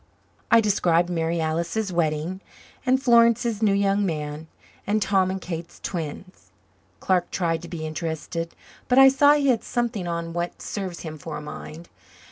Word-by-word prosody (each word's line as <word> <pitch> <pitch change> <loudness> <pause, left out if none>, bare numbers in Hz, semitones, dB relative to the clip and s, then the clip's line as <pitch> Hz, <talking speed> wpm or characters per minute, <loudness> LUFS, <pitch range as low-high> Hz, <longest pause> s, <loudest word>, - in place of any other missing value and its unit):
I 230 - +6
described 175 -4 +2
Mary 165 0 -1
Alice's 170 +6 -1
wedding, 165 +2 -1 0.5
and 260 +1 +4
Florence's 235 -2 +3
new 215 -2 +4
young 200 0 +2
man, 155 -3 -3 0.4
and 210 +2 +2
Tom 190 -3 +2
and 190 0 -3
Kate's 170 -2 -7
twins. 170 +1 -6 0.5
Clark 180 -2 +1
tried 165 -3 -1
to 170 - -9
be 160 -3 -5
interested 165 +1 -4 0.3
but 250 - +2
I 270 0 +9
saw 285 +2 +5
he 285 -2 +2
had 235 -4 +2
something 235 -6 -2
on 170 -1 -3
what 175 0 -3
serves 190 -4 -5
him 155 -2 -7
for 155 0 -6
a - - -6
mind. 155 +2 -9
175 Hz, 160 wpm, -24 LUFS, 165-215 Hz, 0.5 s, I